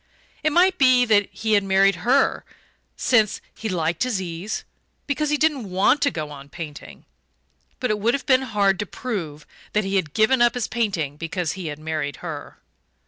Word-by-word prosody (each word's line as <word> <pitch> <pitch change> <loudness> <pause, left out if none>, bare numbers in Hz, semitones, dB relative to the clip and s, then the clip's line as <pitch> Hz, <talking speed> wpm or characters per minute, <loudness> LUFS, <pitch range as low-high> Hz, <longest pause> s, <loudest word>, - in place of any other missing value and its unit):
It 310 - +1
might 370 +4 +3
be 255 -2 +5
that 205 -3 +3
he 220 -1 -2
had 205 -1 +4
married 195 -1 +3
her 255 +8 +2 0.5
since 220 -5 +2
he 220 - -5
liked 170 -2 -1
his 250 -6 0
ease 180 +3 -4 0.4
because 295 +1 -1
he 300 - +2
didn't 290 -9 0
want 190 +10 +3
to 285 - +3
go 155 - -5
on 140 -1 -11
painting; 150 -2 -9 0.7
but 250 -4 0
it 210 - -1
would 230 +5 +2
have 280 - -5
been 260 -2 +4
hard 200 -6 +1
to 210 - -3
prove 170 -13 -5 0.3
that 210 - +2
he 195 0 0
had 155 -6 -2
given 240 +4 +3
up 240 +1 +4
his 245 - -1
painting 185 -11 -2
because 165 0 -3
he 185 -3 -6
had 150 -1 -5
married 155 -2 -3
her. 150 -4 -7
205 Hz, 190 wpm, -23 LUFS, 165-250 Hz, 0.7 s, be